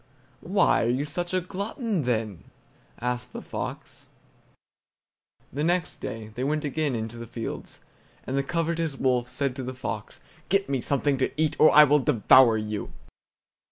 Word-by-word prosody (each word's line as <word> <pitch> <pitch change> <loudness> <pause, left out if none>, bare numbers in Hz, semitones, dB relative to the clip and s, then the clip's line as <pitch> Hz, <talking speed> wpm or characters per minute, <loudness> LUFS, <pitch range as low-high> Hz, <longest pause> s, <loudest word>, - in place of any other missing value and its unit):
"Why - - +2
are - - +1
you 130 +4 0
such 175 +4 -4
a 185 0 +1
glutton, 200 - -3
then?" 110 -6 -2 0.5
asked 125 0 -3
the - - -6
fox. - - -7 1.5
The 145 +3 -2
next 175 +1 0
day 110 -3 -6
they 120 +4 -5
went 150 +2 0
again 145 -1 -1
into 115 +1 -4
the 115 0 -7
fields, 115 0 -7 0.4
and 130 - -4
the 140 - +2
covetous 165 0 -1
wolf 125 -2 +1
said 140 -1 -1
to 130 - -4
the 130 +1 -5
fox: 110 -4 -5 0.3
"Get 195 +1 +2
me 135 -2 -1
something 140 0 0
to 130 - +1
eat 155 -1 +1
now, 155 - +8
or - - +6
I 150 - +9
will 150 0 +4
devour 120 -1 +5
you!" 105 -1 -4
135 Hz, 165 wpm, -26 LUFS, 120-155 Hz, 1.5 s, I